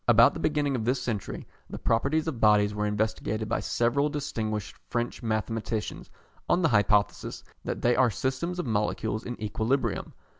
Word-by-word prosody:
About 115 0 +7
the - - -6
beginning 145 -2 +1
of 115 - -1
this 125 +3 +1
century, 110 -5 -4 0.2
the - - -6
properties 140 +7 +1
of 140 -8 -3
bodies 105 -1 +5
were 105 0 -1
investigated 110 +1 -1
by - - 0
several 135 +5 +1
distinguished 110 - -3
French 120 +1 -2
mathematicians 110 -1 -2 0.4
on 180 - +3
the 165 - +4
hypothesis 105 -1 +2 0.2
that - - -3
they 120 0 +4
are 130 0 +4
systems 135 +10 -2
of 180 - -2
molecules 110 0 -1
in 120 - -6
equilibrium. 110 +5 -1
115 Hz, 160 wpm, -28 LUFS, 110-130 Hz, 0.4 s, About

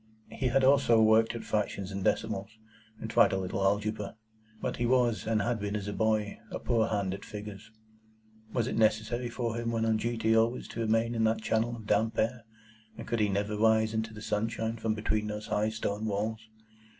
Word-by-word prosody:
He 130 - -1
had 130 +2 +2
also 130 -4 +5
worked 110 +1 +4
at 115 - -5
fractions 100 -2 -2
and 95 0 -4
decimals, 100 +4 -1 0.4
and - - -5
tried 115 -1 +4
a - - +1
little 95 +1 -3
algebra; 105 +1 0 0.4
but - - -3
he 120 - 0
was, 120 -3 +2
and 110 -2 +1
had 120 0 -1
been 100 0 -3
as 105 -1 -3
a 105 - -3
boy, 110 -1 0
a - - -4
poor 115 -2 +1
hand 100 -4 -1
at 100 - -7
figures. 105 0 -8 0.8
Was 120 -1 0
it 130 - -3
necessary 110 +2 +1
for 120 -1 -2
him 115 0 -2
when 115 -1 0
on 110 -1 +2
duty 115 0 +1
always 115 +2 +1
to - - -7
remain 115 +1 +1
in 115 -1 0
that 110 0 +1
channel 115 +2 0
of 110 -2 -10
damp 110 +2 +1
air, 115 +1 0 0.5
and 115 - -8
could 115 - -1
he 105 -1 +2
never 100 +2 -1
rise 110 0 +3
into 110 0 -2
the 105 0 -10
sunshine 115 +2 -2
from 110 -1 -1
between 105 0 -1
those 105 0 -5
high 105 +1 0
stone 110 -1 -3
walls? 110 +2 -2
110 Hz, 205 wpm, -30 LUFS, 105-115 Hz, 0.8 s, also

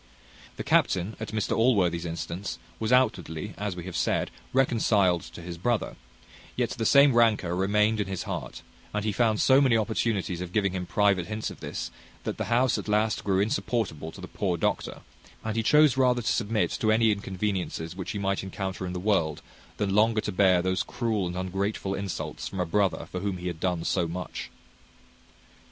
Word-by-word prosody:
The - - -5
captain, 95 +4 +2
at 110 - -4
Mr 110 0 -1
Allworthy's 90 -8 +2
instance, 85 +3 -4 0.2
was 110 +1 -1
outwardly, 100 -7 +1
as 100 -3 -3
we 90 - -6
have 95 0 -7
said, - - 0 0.2
reconciled 110 -9 +3
to 85 - -11
his 85 -1 -7
brother; 120 +4 0 0.6
yet - - 0
the 115 - -1
same 140 -1 +6
rancour 110 -7 +3
remained 105 +3 +2
in 100 - -2
his 95 -2 -3
heart; - - -5 0.3
and 105 0 -1
he 110 - +1
found 110 0 +2
so 135 +1 +5
many 125 -5 +4
opportunities 105 -5 -1
of 90 -1 -6
giving 100 -3 +2
him 90 -1 -3
private 100 -4 +2
hints 110 0 -3
of - - -11
this, - - -5 0.3
that - - -4
the - - -1
house 125 +1 +2
at - - -7
last 105 +1 +1
grew 95 -1 +2
insupportable 100 -7 -1
to 95 - -12
the 90 - -7
poor 90 -3 -1
doctor; - - -2 0.4
and 110 0 -3
he 115 - +2
chose 150 +3 +5
rather 125 -2 +3
to - - +1
submit 110 -1 0
to 110 - +2
any 110 0 +4
inconveniences 95 -4 -3
which 95 -1 -6
he 105 - -3
might 100 -1 0
encounter 95 -1 -4
in 90 - -4
the 90 - -3
world, 85 -6 0 0.3
than 100 -2 0
longer 110 +2 +4
to 105 - -3
bear 95 -2 +4
these 95 0 +1
cruel 110 -6 -1
and 90 +1 -5
ungrateful 95 +2 -2
insults 100 -2 -4
from 95 - -6
a 90 - +1
brother 85 -2 0
for 90 - -3
whom 100 -1 -2
he 90 - -8
had 85 -3 -3
done 90 -2 -1
so 85 -1 +1
much. 90 +1 -5
100 Hz, 195 wpm, -27 LUFS, 90-110 Hz, 0.6 s, same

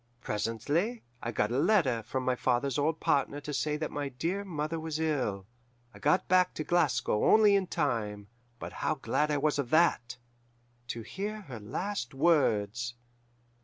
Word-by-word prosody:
"Presently 145 - -1 0.2
I 120 - -3
got 105 -1 0
a 125 - +1
letter 155 - +3
from 130 +4 -4
my 130 0 +2
father's 130 +2 0
old 160 +2 0
partner 140 +1 +1
to 145 +1 -6
say 150 +1 0
that 155 0 -3
my 145 -1 -3
dear 165 +10 -2
mother 160 -3 -3
was 160 -1 -4
ill. 130 -12 -1 0.5
I - - -13
got 150 +6 +2
back 185 0 +3
to 155 - -3
Glasgow 135 -10 +1
only 215 -2 +6
in 195 -2 +1
time 105 -9 -2 0.3
but - - -7
how - - +1
glad 150 +1 0
I 150 - +1
was 150 +1 +1
of 130 -4 -2
that! 130 -6 +2 0.7
to 115 -1 -5
hear 210 - -5
her 130 - -9
last 135 - -4
words. 120 -7 +2
145 Hz, 165 wpm, -30 LUFS, 120-165 Hz, 0.7 s, only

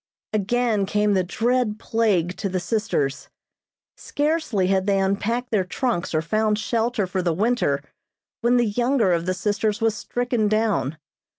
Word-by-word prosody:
Again 215 0 +1
came 210 0 +2
the 190 -1 +2
dread 230 +3 0
plague 200 -7 0
to 195 - -2
the 185 0 -1
sisters. 175 -8 -1 0.7
Scarcely 295 - 0
had 190 +1 +1
they 200 -1 +3
unpacked 210 +6 -1
their 210 -4 +2
trunks 185 -3 -2
or 155 - +1
found 215 +4 +1
shelter 220 +1 0
for 185 +1 -2
the 170 -2 0
winter 205 - +1 0.6
when 240 +1 +3
the 240 - +3
younger 240 -1 +1
of 170 +1 -1
the 185 - 0
sisters 210 +2 -1
was 225 -1 +2
stricken 245 0 -1
down. 205 - 0
210 Hz, 155 wpm, -23 LUFS, 185-235 Hz, 0.7 s, they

